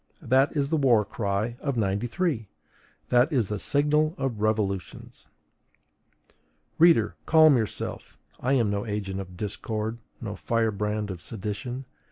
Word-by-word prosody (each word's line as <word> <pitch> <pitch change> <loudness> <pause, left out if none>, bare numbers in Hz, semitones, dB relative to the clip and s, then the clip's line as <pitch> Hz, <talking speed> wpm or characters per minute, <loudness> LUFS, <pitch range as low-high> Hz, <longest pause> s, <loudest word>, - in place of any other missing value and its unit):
That 135 +4 +3
is 140 +1 0
the 160 - +3
war 120 -7 +4
cry 105 +2 -2
of 140 -4 -2
'93! 115 - -1 0.6
That 125 +5 +4
is 120 -9 +1
the 105 -1 -2
signal 150 - +2
of 120 -6 -3
revolutions! 105 -3 -2 1.5
Reader, 160 -10 +5
calm 155 -2 +7
yourself: 110 -5 -4 0.2
I 130 +2 0
am 115 -6 +2
no 100 0 -1
agent 105 -3 -3
of 90 -2 -8
discord, 110 +2 -3 0.2
no 105 -4 -5
firebrand 105 -2 -1
of 90 -2 -7
sedition. 115 +6 -5
115 Hz, 130 wpm, -26 LUFS, 105-135 Hz, 1.5 s, calm